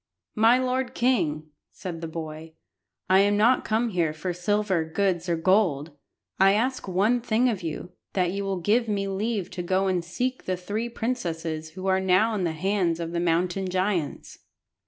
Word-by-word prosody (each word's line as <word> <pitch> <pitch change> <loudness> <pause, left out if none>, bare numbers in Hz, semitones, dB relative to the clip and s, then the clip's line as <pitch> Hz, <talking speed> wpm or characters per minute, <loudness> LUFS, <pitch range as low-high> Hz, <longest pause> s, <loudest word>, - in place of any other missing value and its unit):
"My 225 +3 +5
lord 255 0 -1
king," 155 -12 0 0.2
said 170 -3 -7
the 165 - -4
boy, 160 0 -7 0.5
"I 190 +1 +5
am 205 +1 +3
not 235 +5 +4
come 230 +2 0
here 170 -6 0
for 175 +3 -3
silver, 190 -1 0
goods, 175 +1 -1
or 170 - +2
gold! 165 -4 +2 0.5
I 195 +1 +6
ask 250 +4 0
one 205 +7 +2
thing 235 +1 +2
of 215 -6 -1
you, 170 +1 -5 0.2
that 180 -2 +1
you 200 +1 -3
will 195 -2 -2
give 225 +6 +2
me 200 -2 -1
leave 200 0 -2
to 180 - -4
go 185 +2 +1
and 185 -2 0
seek 250 +9 -3
the 185 -1 -1
three 210 +6 -3
princesses 165 -10 -3
who 185 0 -7
are 190 0 +3
now 190 +4 +3
in 195 -4 -1
the 165 - 0
hands 175 0 0
of 165 -1 -4
the 170 - -1
mountain 175 +2 0
giants." 185 -4 -2
190 Hz, 180 wpm, -26 LUFS, 170-215 Hz, 0.5 s, I